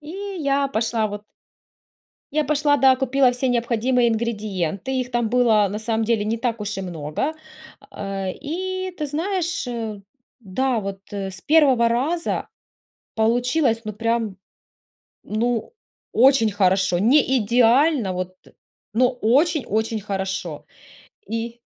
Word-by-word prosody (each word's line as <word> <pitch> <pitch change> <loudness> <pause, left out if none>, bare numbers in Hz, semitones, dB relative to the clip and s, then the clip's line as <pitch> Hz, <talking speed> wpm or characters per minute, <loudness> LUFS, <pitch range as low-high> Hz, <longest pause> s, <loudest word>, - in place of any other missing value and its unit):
И 300 - -13 0.3
я 280 -2 +1
пошла 225 -3 0
вот 205 0 -6 1.1
я 305 0 +1
пошла, 290 0 +2
да, 265 -2 +5
купила 265 -1 +3
все 255 +1 -1
необходимые 240 +1 +2
ингредиенты, 215 -2 -2
их 250 0 -5
там 240 -2 0
было 230 -3 +4
на 205 +2 -4
самом 225 0 0
деле 220 -2 +1
не 225 +2 -1
так 230 -2 -2
уж 210 -1 -4
и - - -2
много. 175 - -3 0.6
А, 195 -1 -4
и 370 - -4
ты 300 - -3
знаешь, 345 +2 -2 0.7
да, 240 +5 -1
вот 195 -1 -5
с 195 -1 -5
первого 270 -6 +4
раза 285 +9 -1 0.7
получилось, 240 +2 +2
ну, 215 - -5
прям, 225 -2 -1 0.9
ну, 230 - -2 0.4
очень 250 -2 +5
хорошо, 190 -2 +2
не 260 +4 +4
идеально, 240 - +3
вот, 185 0 -5 0.6
ну, 245 +3 +4
очень-очень 245 - +1
хорошо. 195 -1 -4 0.6
И 230 +1 -4
235 Hz, 120 wpm, -22 LUFS, 210-270 Hz, 1.1 s, да